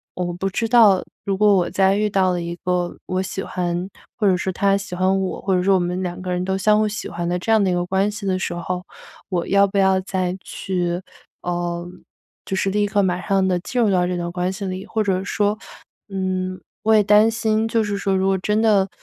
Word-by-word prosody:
我 175 -1 -2
不 190 +3 -2
知 225 +4 -1
道， 220 -5 +5 0.2
如 195 -1 -1
果 210 0 +5
我 180 -2 +1
再 190 +1 +3
遇 210 +1 +1
到 190 -2 +2
了 175 -1 -1
一 170 0 -4
个 180 -1 -1
我 185 0 -1
喜 190 0 -4
欢 175 0 -3 0.3
或 210 - +2
者 190 - +4
说 190 +1 -2
他 195 +2 +2
喜 195 -2 -7
欢 190 +1 +2
我， 190 - -3
或 190 -1 +1
者 180 - +1
说 195 +1 +4
我 - - +3
们 180 +1 -2
两 180 0 -4
个 185 0 -4
人 180 0 -1
都 190 0 0
相 210 +2 +3
互 215 - +2
喜 210 0 -4
欢 170 0 -4
的 180 0 -1
这 185 - -6
样 220 -2 +5
的 190 - +2
一 - - +1
个 175 0 0
关 190 +3 +1
系 210 0 -7
的 190 -1 +1
时 185 - -3
候。 180 +1 -4 0.5
我 175 -3 -1
要 200 0 +5
不 200 +1 -4
要 190 -1 +3
再 185 -1 -2
去， 175 -2 -2 0.4
呃， 175 0 -3 0.6
就 190 - -3
是 195 - +1
立 205 +1 +1
刻、 205 0 +1
马 180 -2 0
上 195 -1 +2
地 180 -1 +1
进 245 +7 -2
入 220 - +3
到 180 -2 +2
这 180 0 -2
段 175 0 -3
关 180 +1 -1
系 195 +1 -5
里。 185 0 -4
或 220 - -1
者 190 -2 0
说， 205 +1 0 0.5
嗯， 185 -1 -2 0.2
我 220 - +4
也 215 - +6
担 210 +2 +5
心， 220 0 0
就 225 0 +1
是 205 -1 -2
说 200 -1 0
如 190 0 +1
果 195 0 +2
真 210 +3 0
的， 205 -4 +3
190 Hz, 265 characters per minute, -21 LUFS, 180-200 Hz, 0.6 s, 也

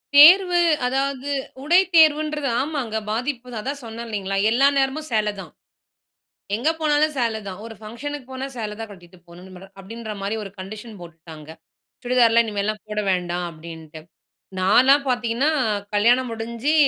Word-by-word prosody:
தேர்வு, 350 +4 +8 0.2
அதாவது 270 +1 -1 0.3
உடை 345 +5 +5
தேர்வுன்றது 305 -2 +4
ஆமாங்க, 270 -7 -3 0.2
பாதிப்புதான். 245 -1 -4
அதான், 280 +2 -4
சொன்னேன் 230 +1 -7
இல்லைங்களா? 195 -2 -3
எல்லா 260 +5 +4
நேரமும் 275 +3 0
சேலைதான். 210 -2 -2 1.1
எங்க 245 +8 0
போனாலும் 305 0 +2
சேலைதான். 220 -5 -2
ஒரு 225 -1 -9
ஃபங்க்ஷனுக்கு 255 +6 -7
போனா, 260 +1 -5
சேலைதான் 220 -1 -6
கட்டிட்டு 180 -2 -15
போணும்னு 180 +2 -13
மேடம் 195 +2 -14
அப்படின்ற 220 +3 -8
மாதிரி 205 +3 -2
ஒரு 200 - -8
கண்டிஷன் 210 +3 -9
போட்டுட்டாங்க. 160 -2 -12 0.5
சுடிதார்லாம், 235 -2 +4
இனிமேல்லாம் 210 0 -3
போட 210 0 -2
வேண்டாம், 180 -1 -1
அப்படின்ட்டு. 160 -1 -11 0.6
நான்லாம் 265 +9 +4
பாத்தீங்கன்னா, 245 +3 0 0.4
கல்யாணம் 240 +4 +3
முடிஞ்சு, 235 +6 -2
230 Hz, 130 wpm, -22 LUFS, 200-275 Hz, 1.1 s, தேர்வு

